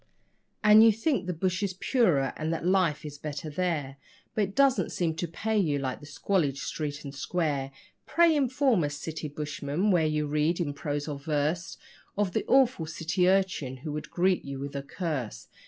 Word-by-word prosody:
And 215 +1 +8
you 225 - +8
think 225 - -1
the - - 0
bush 185 +3 -1
is 195 -3 -2
purer 180 - +2
and 155 +1 -2
that 165 0 -3
life 180 -5 +2
is 145 -1 -8
better 150 0 -5
there, 150 -5 -2 0.4
But 215 - +1
it 195 - -10
doesn't 275 -2 +3
seem 170 -3 0
to 175 - -2
pay 215 +6 -1
you 155 -7 +1
like 130 -2 -3
the 145 - -12
'squalid 145 -2 0
street 145 0 -4
and 140 -2 -7
square'. 145 -2 -2 0.4
Pray 335 -1 +4
inform 260 - +2
us, 145 0 -2
City 155 +1 -5
Bushman, 150 +5 -2
where 165 -4 +3
you 155 -1 0
read, 150 +4 +1
in 150 -5 -1
prose 145 0 -3
or 145 -2 -4
verse, 155 +4 -1 0.4
Of 200 -3 0
the - - -1
awful 255 -11 +3
'city 170 +3 +1
urchin 185 -9 0
who 155 - -3
would 150 +1 -5
greet 185 +1 +1
you 140 -1 -6
with 140 +1 -6
a 140 - -2
curse'. 140 - -4
160 Hz, 190 wpm, -28 LUFS, 145-190 Hz, 0.4 s, And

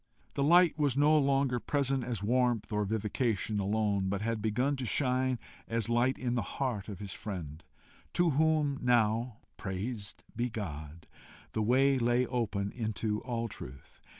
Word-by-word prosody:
The - - -2
light 170 +1 +5
was 140 -3 +2
no 150 +2 +5
longer 135 -3 +2
present 135 0 0
as 115 -5 -3
warmth 120 -1 +1
or 105 0 +1
vivification 110 0 -1
alone, 100 -1 +1
but 100 +1 -2
had 115 -1 -1
begun 125 +7 +1
to 130 - -3
shine 130 0 +1 0.3
as 115 -1 -1
light 120 +3 +2
in 125 -2 -1
the 120 - +1
heart 110 0 -3
of 100 - -6
his 100 -1 -6
friend, 85 -7 -6 0.5
to 175 -2 +3
whom 150 -1 +2
now, 120 -1 +2 0.2
praised 100 +2 -4
be 120 +1 0
God! 80 -7 -6 0.5
the 110 - -1
way 130 +4 +4
lay 120 +1 +2
open 100 -5 -1
into 110 -2 -2
all 115 -2 -2
truth. 70 - -11
115 Hz, 155 wpm, -31 LUFS, 105-130 Hz, 0.5 s, light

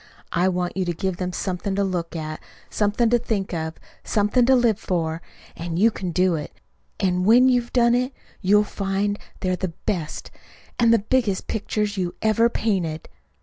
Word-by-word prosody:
I 175 +2 +2
want 180 -1 -2
you 190 - 0
to 175 - -1
give 190 +1 -2
them 180 0 -2
something 190 +2 -3
to 200 - +1
look 175 -3 -2
at, 155 -1 -4 0.3
something 215 +3 +1
to 240 - +4
think 205 -5 -2
of, 160 -1 -3 0.3
something 215 +3 +2
to 265 - +6
live 235 -4 +3
for. 165 -4 -2 0.3
And 165 0 -4
you 225 +5 +5
can 185 -3 -4
do 180 +1 +2
it. 150 -2 -5 0.4
And 180 -2 +1
when 245 +6 +6
you 250 -1 +4
have 235 - -14
done 235 -1 +4
it, 250 +2 +1 0.3
you'll 210 +1 +4
find 200 0 -2 0.2
they're 185 -1 0
the 180 -3 -4
best 170 -7 -3
and - - -25 0.4
and 230 -1 +5
the 230 - +6
biggest 220 -2 0
pictures 210 -1 -2
you 180 -2 -2
ever 220 +2 +4
painted." 180 -9 -2
195 Hz, 190 wpm, -23 LUFS, 180-225 Hz, 0.4 s, to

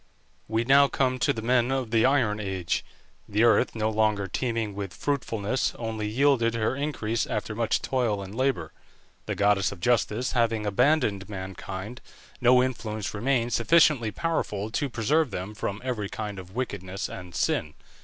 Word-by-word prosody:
We 110 +1 0
now 140 +3 +6
come 130 -2 0
to - - +3
the 110 - -4
men 120 +1 +2
of 130 -4 -1
the 115 +1 +4
Iron 120 -6 +2
Age. 95 -4 -2 0.5
The 105 +2 +2
earth, 120 +1 +4
no 110 -1 0
longer 105 -2 +1
teeming 115 +1 -2
with 100 -2 -6
fruitfulness, 125 -4 -1
only 110 -2 -3
yielded 120 0 +2
her 115 +2 0
increase 125 -6 -2
after 105 0 -3
much 115 0 0
toil 115 -6 0
and 95 +1 -9
labour. 125 - -1 0.5
The - - -2
goddess 100 -1 +2
of 100 - -9
Justice 120 +3 +1
having 115 -3 +1
abandoned 105 -2 +2
mankind, 95 +3 -6 0.4
no 125 0 +6
influence 110 -5 -3
remained 120 +2 0
sufficiently 135 -2 +4
powerful 110 -7 -2
to 140 +5 -1
preserve 140 +6 +1
them 95 +1 -5
from 100 -1 -4
every 115 -6 -3
kind 105 -3 -5
of 95 +2 -12
wickedness 100 -7 -3
and 90 -2 -9
sin. 75 - 0
110 Hz, 160 wpm, -26 LUFS, 100-125 Hz, 0.5 s, now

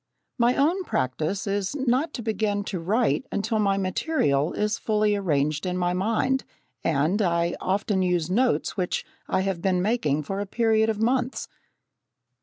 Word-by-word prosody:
My 240 +1 +4
own 335 +7 +2
practice 155 - -1
is 200 +3 -1
not 270 +3 +1
to 235 - -5
begin 210 -2 0
to 195 -3 -4
write 220 +9 +1
until 220 +2 -1
my 200 -2 +2
material 185 - +1
is 210 +1 -1
fully 210 -1 +1
arranged 155 -6 0
in 180 -1 -2
my 180 0 +1
mind, 230 +8 +1 0.4
and 165 +7 +1
I 170 -2 +1
often 195 +1 0
use 175 -3 +1
notes 240 +7 +1
which 180 -3 -2 0.2
I - - +1
have 190 -3 -2
been 185 -1 +1
making 180 - +1
for 195 +7 -4
a 205 - -3
period 220 0 +2
of 215 -1 -1
months. 250 +3 0
200 Hz, 160 wpm, -25 LUFS, 180-225 Hz, 0.4 s, My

